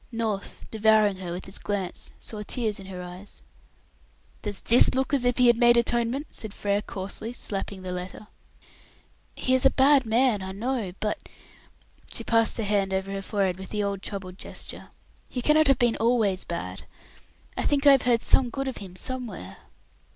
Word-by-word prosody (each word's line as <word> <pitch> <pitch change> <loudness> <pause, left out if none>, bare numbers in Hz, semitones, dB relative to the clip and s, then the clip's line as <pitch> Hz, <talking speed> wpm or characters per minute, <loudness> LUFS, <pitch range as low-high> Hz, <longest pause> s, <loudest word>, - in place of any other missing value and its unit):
North, 220 -4 -3
devouring 215 -2 +3
her 180 -2 -6
with 175 +2 -6
his 190 - -8
glance, 195 -3 -3
saw 215 -2 -5
tears 215 -1 -2
in 195 - -10
her 180 -2 -7
eyes. 180 +3 -10 1.0
"Does 205 -2 -4
this 240 +2 +6
look 265 +2 -1
as 265 -3 +2
if 245 -1 +2
he 250 - +5
had 240 -1 +5
made 240 0 +5
atonement?" 240 +4 +1
said 215 -2 -7
Frere 205 0 0
coarsely, 200 +3 -4
slapping 195 -4 -5
the 185 - -4
letter. 180 +3 -6 1.1
"He 255 - 0
is 260 - +4
a 270 - +7
bad 270 -1 +4
man, 230 -2 +2
I 190 0 -5
know, 225 -2 -2
but 210 -1 -2 0.5
" - - -28
she - - -2
passed 230 -1 +3
her 225 - -1
hand 200 -2 +1
over 190 +1 -2
her 195 0 -3
forehead 195 -3 -1
with 190 - -8
the 210 -1 -1
old 200 -1 -2
troubled 190 -2 -7
gesture - - -7 0.4
"he 250 - -4
cannot 305 +4 +4
have 275 -2 +4
been 240 -3 +2
always 225 -5 +1
bad. 95 - -5 0.7
I - - -2
think 285 0 +1
I 285 - +9
have 270 -2 +5
heard 240 -2 +2
some 255 -2 +4
good 270 +3 -4
of 260 - -4
him 190 -3 -9
somewhere." 215 - -6
215 Hz, 190 wpm, -26 LUFS, 195-245 Hz, 1.1 s, I